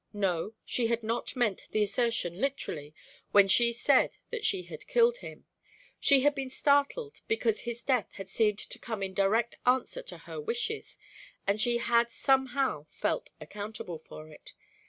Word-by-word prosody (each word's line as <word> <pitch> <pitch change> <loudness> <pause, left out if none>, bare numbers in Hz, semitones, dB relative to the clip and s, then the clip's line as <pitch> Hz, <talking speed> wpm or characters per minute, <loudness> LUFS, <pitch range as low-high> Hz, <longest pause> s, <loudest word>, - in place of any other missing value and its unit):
No, 195 0 -1
she 240 -2 0
had 230 0 -1
not 230 +5 -2
meant 220 -6 0
the 215 - +2
assertion 210 -4 0
literally 155 - -3 0.4
when 200 -1 +7
she 235 +4 +5
said 235 - +3
that 470 -2 -4
she 395 -4 +1
had - - -10
killed 480 0 +4
him; - - -10 0.5
she 275 -2 +5
had 290 +2 +4
been 270 -2 -4
startled 285 - +1
because 445 0 +1
his 235 0 -6
death 255 -6 +1
had 195 -1 -8
seemed 210 +1 +1
to - - -6
come 220 -4 -4
in 190 0 -3
direct 215 +5 +1
answer 260 - +1
to - - -8
her - - -8
wishes, 445 -1 -3 0.5
and 200 +2 +1
she 240 +1 +2
had 235 0 +2
somehow 265 - +1
felt - - -2
accountable 205 0 -6
for 155 0 -11
it. 155 - -14
235 Hz, 165 wpm, -30 LUFS, 205-280 Hz, 0.5 s, when